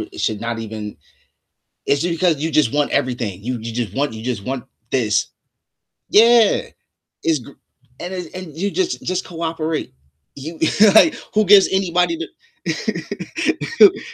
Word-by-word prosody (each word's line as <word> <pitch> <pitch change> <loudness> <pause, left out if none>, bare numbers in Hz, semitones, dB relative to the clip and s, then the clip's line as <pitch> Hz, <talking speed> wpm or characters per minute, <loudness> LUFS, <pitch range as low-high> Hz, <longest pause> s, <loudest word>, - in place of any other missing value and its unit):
it 110 - -7
should 110 -2 -1
not 115 0 -3
even 110 -3 -6 0.9
it's 140 +1 +1
just 170 0 0
because 170 -3 +2
you 160 +3 -2
just 145 -5 +2
want 145 -1 +1
everything. 115 -7 -2
You 125 +3 -2
you 115 +1 -6
just 115 -5 -3
want 140 -4 0
you 110 - -8
just 120 -5 -3
want 130 +1 -4 0.3
this. 110 -6 +1 0.8
Yeah. 230 0 +5 0.5
It's 160 -4 +1
g - - -14 0.5
and 180 +2 -5
it 180 -4 -7
and 180 -5 -8
you 200 +4 -1
just 365 - -2
just 185 0 -2
cooperate. 165 - -3 0.4
You 160 +4 -8 0.4
like, 320 - +7 0.2
who 215 0 +4
gives 200 0 +7
anybody 185 - +1 0.5
the 415 -5 +1
155 Hz, 150 wpm, -20 LUFS, 120-185 Hz, 0.9 s, like